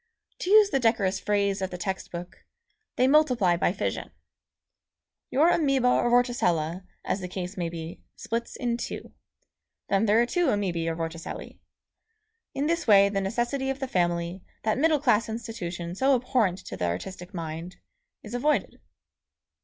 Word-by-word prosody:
To 360 Hz, -, -3 dB
use 420 Hz, 0 st, +7 dB
the 270 Hz, -, +2 dB
decorous 225 Hz, -6 st, +2 dB
phrase 200 Hz, -1 st, 0 dB
of 190 Hz, -, -1 dB
the 180 Hz, -, -6 dB
text 190 Hz, +1 st, -4 dB
book, 175 Hz, +2 st, -8 dB, 0.5 s
"They 255 Hz, -, +3 dB
multiply 250 Hz, -, +4 dB
by 170 Hz, -, +1 dB
fission." -, -, -3 dB, 1.2 s
Your 315 Hz, +6 st, +4 dB
amoeba 275 Hz, -7 st, +3 dB
or 240 Hz, -, +2 dB
vorticella, 185 Hz, -8 st, +1 dB, 0.2 s
as 195 Hz, -, -1 dB
the 180 Hz, -, -5 dB
case 180 Hz, +1 st, -5 dB
may 175 Hz, -2 st, -2 dB
be, 165 Hz, 0 st, -7 dB
splits 230 Hz, +1 st, -4 dB
in 240 Hz, -1 st, -1 dB
two. -, -, -6 dB, 0.8 s
Then 200 Hz, +3 st, +2 dB
there 210 Hz, +2 st, +5 dB
are 240 Hz, -, +4 dB
two 350 Hz, +6 st, +1 dB
amoebæ 185 Hz, -8 st, 0 dB
or 165 Hz, -, -1 dB
vorticellæ. 165 Hz, 0 st, -6 dB, 1.0 s
In 280 Hz, -, 0 dB
this 335 Hz, -1 st, 0 dB
way 200 Hz, -2 st, +7 dB
the 200 Hz, -1 st, -1 dB
necessity 240 Hz, +7 st, -1 dB
of 270 Hz, 0 st, -2 dB
the 270 Hz, -, -3 dB
family, 175 Hz, -2 st, -1 dB, 0.2 s
that 220 Hz, +2 st, +1 dB
middle 310 Hz, 0 st, +3 dB
class 235 Hz, -5 st, +2 dB
institution 180 Hz, -7 st, -5 dB
so 265 Hz, +8 st, +3 dB
abhorrent 240 Hz, -7 st, +1 dB
to -, -, -6 dB
the 90 Hz, -, -2 dB
artistic 175 Hz, -, -4 dB
mind, 165 Hz, +1 st, -5 dB, 0.5 s
is 215 Hz, -, -9 dB
avoided. 295 Hz, +5 st, 0 dB
205 Hz, 160 wpm, -27 LUFS, 175-250 Hz, 1.2 s, use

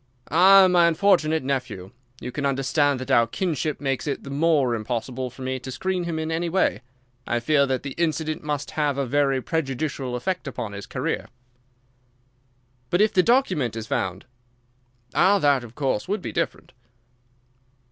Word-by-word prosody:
"Ah, 190 Hz, +4 st, +7 dB
my 175 Hz, -2 st, +4 dB
unfortunate 160 Hz, -3 st, +2 dB
nephew! 125 Hz, -9 st, -3 dB, 0.3 s
You -, -, -6 dB
can 145 Hz, -, -4 dB
understand 140 Hz, +1 st, +1 dB
that 130 Hz, -, -5 dB
our 115 Hz, -1 st, +5 dB
kinship 155 Hz, -3 st, -2 dB
makes 135 Hz, 0 st, -2 dB
it 140 Hz, -, -3 dB
the 140 Hz, -, -8 dB
more 145 Hz, -4 st, +2 dB
impossible 120 Hz, +3 st, -3 dB
for 130 Hz, +2 st, -11 dB
me 130 Hz, 0 st, -2 dB
to 130 Hz, -, -8 dB
screen 180 Hz, +6 st, -2 dB
him 165 Hz, -2 st, -3 dB
in 160 Hz, 0 st, -3 dB
any 170 Hz, +1 st, -1 dB
way. 190 Hz, -5 st, +1 dB, 0.5 s
I 120 Hz, -, 0 dB
fear 140 Hz, +3 st, +2 dB
that 130 Hz, -1 st, -1 dB
the 140 Hz, -, -5 dB
incident 155 Hz, -2 st, -1 dB
must 145 Hz, -1 st, -3 dB
have 145 Hz, -3 st, 0 dB
a 140 Hz, -, 0 dB
very 135 Hz, 0 st, +1 dB
prejudicial 135 Hz, -4 st, -2 dB
effect 155 Hz, +6 st, -3 dB
upon 115 Hz, -5 st, -5 dB
his 100 Hz, 0 st, -8 dB
career." -, -, -3 dB, 1.6 s
"But 175 Hz, -, +1 dB
if 215 Hz, 0 st, +3 dB
the 185 Hz, -, +5 dB
document 185 Hz, -, +1 dB
is 110 Hz, -1 st, -5 dB
found?" 95 Hz, -1 st, -3 dB, 0.9 s
"Ah, 195 Hz, +3 st, +4 dB
that, 145 Hz, -7 st, +2 dB
of 120 Hz, -1 st, -12 dB
course, 135 Hz, -7 st, -1 dB
would 205 Hz, +3 st, -2 dB
be -, -, -4 dB
different." -, -, -3 dB
145 Hz, 165 wpm, -24 LUFS, 130-165 Hz, 1.6 s, Ah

